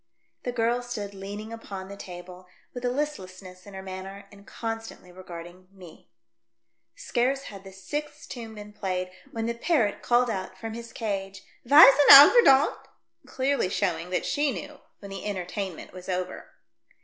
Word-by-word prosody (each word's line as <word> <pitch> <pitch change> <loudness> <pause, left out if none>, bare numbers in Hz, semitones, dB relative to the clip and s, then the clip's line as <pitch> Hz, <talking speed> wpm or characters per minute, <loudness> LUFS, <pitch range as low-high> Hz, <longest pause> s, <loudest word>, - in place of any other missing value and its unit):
The 245 - -3
girl 240 0 0
stood 210 -5 -6
leaning 205 +3 -7
upon 195 -4 -8
the 200 - -9
table, 180 -1 -11 0.3
with 245 - -7
a 245 - +1
listlessness 185 -10 -5
in 200 - -11
her 190 - -7
manner 195 +1 -8
and 200 0 -17
constantly 225 -5 -6
regarding 180 0 -11
me. 185 -4 -15 0.9
Scarce 265 +3 -1
had 195 -2 -10
the 195 - -11
sixth 295 +10 -6
tune 225 -3 -8
been 210 0 -10
played 185 -3 -3 0.2
when 225 -1 -4
the 235 - -1
parrot 235 -4 0
called 240 0 +2
out 190 -3 -5
from 225 -1 -6
his 235 0 -8
cage, 195 -3 -4 0.2
"Mb 290 +5 +9
3B» 285 +1 +7
al 280 +2 +12
liJerdomD!" 290 - +5 0.5
clearly 265 -7 0
showing 185 -3 -1
that 180 - -1
she 290 -1 0
knew 295 +2 -8 0.2
when 200 -1 -11
the 195 - -7
entertainment 190 -2 -5
was 185 0 -10
over. 180 0 -4
205 Hz, 160 wpm, -26 LUFS, 185-245 Hz, 0.9 s, al